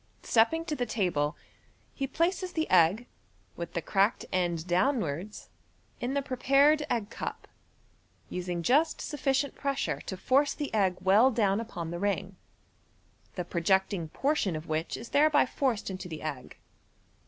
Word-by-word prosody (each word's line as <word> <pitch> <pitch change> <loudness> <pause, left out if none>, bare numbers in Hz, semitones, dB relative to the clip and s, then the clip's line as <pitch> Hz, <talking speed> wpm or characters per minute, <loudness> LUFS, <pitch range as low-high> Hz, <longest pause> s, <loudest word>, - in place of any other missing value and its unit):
' - - -35
Stepping 245 +9 +2
to 310 - -2
the 245 -3 -2
table, 170 -9 0 0.6
he 275 - -3
places 360 +6 -1
the 320 -1 -1
egg, 185 +6 +4 0.5
with 170 0 -6
the 170 - -2
cracked 200 +3 +1
end 175 -3 0
downwards, 185 - -1 0.5
in 250 +3 -2
the 280 - 0
prepared 280 +3 +3
egg 225 -2 -1
cup, - - -6 0.8
using 175 -1 -4
just 295 - +3
sufficient 280 -1 -1
pressure 275 -1 -2
to 190 - -6
force 275 +8 +2
the 290 -5 -4
egg 190 -4 +2
well 200 +7 +5
down 210 -5 +1
upon 175 -8 -5
the 175 - -4
ring, 195 -1 -1 1.0
the 180 - -3
projecting 180 0 +1
portion 270 - 0
of 155 +1 -6
which 160 +1 -2
is 230 - -9
thereby 295 0 +4
forced 250 -7 -1
into 185 -1 -6
the 155 -2 -7
egg. 145 -5 -6
205 Hz, 150 wpm, -29 LUFS, 175-275 Hz, 1.0 s, well